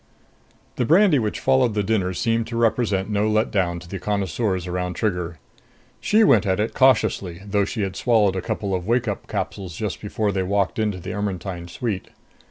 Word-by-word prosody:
The - - +1
brandy 170 - +5
which 105 -3 -2
followed 130 -4 +2
the 105 - +1
dinner 95 -3 0
seemed 115 +2 0
to 115 0 -4
represent 110 -4 +1
no 105 +1 +1
let 110 +1 +1
down 90 -4 0
to 85 - -12
the 95 +2 -6
connoisseurs 95 0 -1
around 90 0 -3
Trigger. 90 -5 -2 0.6
She 220 +2 +3
went 110 - +4
at 95 0 +1
it 110 +2 -1
cautiously, 110 -8 +2
though 100 0 +1
she 110 +2 -4
had 95 -1 -3
swallowed 105 -5 +2
a 95 - -1
couple 100 +1 -3
of 90 0 -2
wake 120 +1 +1
up 100 - -4
capsules 95 -4 -4
just 105 0 -4
before 105 0 -1
they 95 -1 -1
walked 100 +2 0
into 105 -3 0
the 90 - -6
Ermetyne 95 -3 -4
suite. 100 +1 -4
100 Hz, 190 wpm, -23 LUFS, 95-115 Hz, 0.6 s, brandy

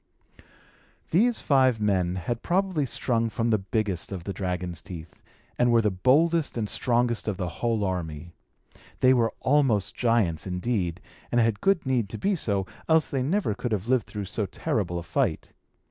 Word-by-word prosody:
These 225 +8 +3
five 130 -5 +3
men 95 -4 +1
had 115 +6 -3
probably 180 -5 0
sprung 115 -1 0
from 115 +1 -1
the 110 - +3
biggest 100 -2 -2
of 95 -3 -5
the 100 - -4
dragon's 90 -3 -3
teeth, 85 -3 -10 0.4
and 120 0 +4
were 115 - +5
the 105 - +2
boldest 150 - +2
and 110 -2 -1
strongest 120 0 0
of 105 -3 -1
the 90 -2 -2
whole 115 -3 +1
army. 85 -3 -4 0.7
They 130 0 +6
were 115 -3 +2
almost 130 -8 +2
giants, 110 -10 +1
indeed, 90 -1 -2 0.3
and 120 - +3
had 115 -3 +1
good 195 -5 +2
need 125 -6 0
to - - -6
be 200 +1 +1
so, 100 - -1 0.2
else 160 -1 +4
they 135 - 0
never 155 - 0
could 120 +3 -4
have 105 0 -2
lived 130 -3 +2
through 105 -2 -5
so 100 +2 -2
terrible 95 -1 -2
a 85 - -4
fight. 80 0 -1
110 Hz, 175 wpm, -26 LUFS, 95-130 Hz, 0.7 s, They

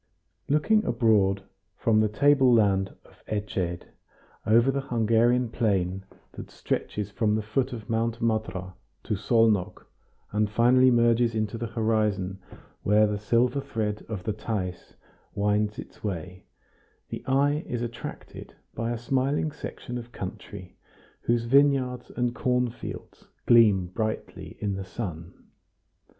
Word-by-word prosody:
Looking 215 +10 +3
abroad 105 -5 +2 0.3
from 110 -2 +2
the 110 0 +3
table 140 +2 +4
land 100 -4 +2
of - - -21
Esced, 95 -4 -3 0.6
over 115 +4 +5
the 140 +1 -1
Hungarian 120 0 +2
plain 95 -4 0 0.3
that - - -9
stretches 105 -1 -3
from 105 0 +1
the 110 - -1
foot 125 +6 -1
of 115 -4 -7
Mount 115 0 -1
Matra 100 -5 -2 0.3
to 110 - -2
Szolnok, 110 -2 +1 0.5
and 105 0 +1
finally 125 +4 +5
merges 120 -1 +3
into 110 0 -1
the 115 +1 -3
horizon 105 -4 0 0.4
where 105 +1 +4
the 105 -1 -1
silver 120 +6 +1
thread 105 -4 -3
of 105 -5 -5
the 110 - -1
Theiss 100 -5 -5 0.4
winds 105 +1 +1
its - - -10
way, 90 -2 -5 0.6
the - - -6
eye 145 +3 +2
is 120 -1 -3
attracted 120 0 -8 0.2
by 115 0 -3
a 120 - -2
smiling 135 +6 0
section 125 -3 -7
of 120 0 -11
country 95 -2 -8 0.5
whose 120 0 +1
vineyards 130 -1 +2
and 120 -1 0
cornfields 125 -1 -3 0.2
gleam 105 -6 +5
brightly 110 +4 -5
in 100 -1 -1
the 95 0 -4
sun. 90 -4 -8
110 Hz, 130 wpm, -26 LUFS, 105-120 Hz, 0.6 s, over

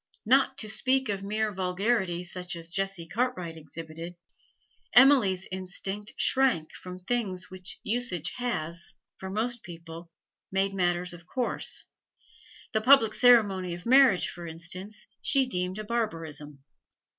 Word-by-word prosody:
Not 265 +5 +4
to 215 - -3
speak 260 +3 +1
of 195 -1 -1
mere 215 +1 -1
vulgarity 185 -1 0
such 180 0 -6
as 165 0 -9
Jessie 195 -2 -2
Cartwright 195 -5 -2
exhibited, 165 +2 -9 0.8
Emily's 245 -8 +6
instinct 195 +2 -4
shrank 255 -12 +3
from 180 0 -9
things 190 -2 -3
which 185 0 -5
usage 215 -7 -1
has, 170 -9 -3 0.2
for 190 - -6
most 225 +4 -1
people, 165 0 -10 0.4
made 195 +1 +1
matters 180 -1 0
of 170 0 -13
course; 250 +5 -2 0.9
the 220 - +2
public 250 -3 +6
ceremony 200 -8 +4
of 175 - -11
marriage, 255 -6 +6
for 175 -1 -7
instance, 175 +5 -6 0.2
she 270 -2 +3
deemed 180 -5 -2
a 215 - -4
barbarism. 165 - -4
190 Hz, 130 wpm, -28 LUFS, 175-230 Hz, 0.9 s, Emily's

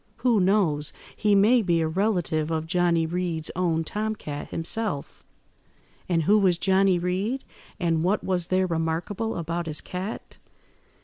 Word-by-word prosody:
Who 235 -4 +4
knows, 180 -7 +2 0.2
he 210 -1 +2
may 225 +5 +5
be 175 -5 +1
a 160 - +1
relative 175 -4 0
of 160 -1 -1
Johnny 170 -1 +2
Reed's 165 -2 -2
own 170 -3 +1
tom–cat 210 -6 -4
himself." 165 -2 -3 0.9
"And 165 -2 +2
who 210 +7 +4
was 185 -4 +3
Johnny 190 0 +3
Reed? 190 +9 -1 0.4
and 165 -3 +1
what 195 +4 +1
was 180 -2 -1
there 185 0 +2
remarkable 170 +6 -2
about 170 0 -3
his 155 -1 -2
cat?" 185 +4 -6
180 Hz, 140 wpm, -25 LUFS, 165-200 Hz, 0.9 s, may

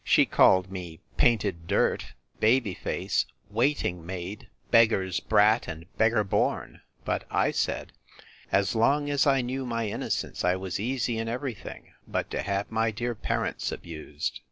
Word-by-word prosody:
She - - +5
called 95 0 +4
me 90 -4 -7 0.2
painted 100 -8 +2
dirt, - - +1 0.3
baby 115 -3 +3
face, - - -1 0.2
waiting 115 - 0
maid, 95 +6 -6 0.2
beggar's 110 -6 +4
brat, 110 +3 +3
and 80 0 -7
beggar 110 -1 +3
born; 95 - -1 0.2
but - - -1
I - - +2
said, - - -2 0.6
As 100 0 +2
long 145 +6 +2
as 145 0 +2
I 135 -2 +4
knew 130 +2 -3
my 115 -3 -2
innocence, - - -3
I 90 +1 +3
was 95 -1 -4
easy 120 0 -1
in 115 - -2
every 125 +2 -2
thing, 105 - -11
but - - -2
to - - -1
have 100 0 -2
my 115 0 +1
dear 120 +3 -2
parents 110 - -2
abused. 80 -3 -5
110 Hz, 155 wpm, -27 LUFS, 95-120 Hz, 0.6 s, She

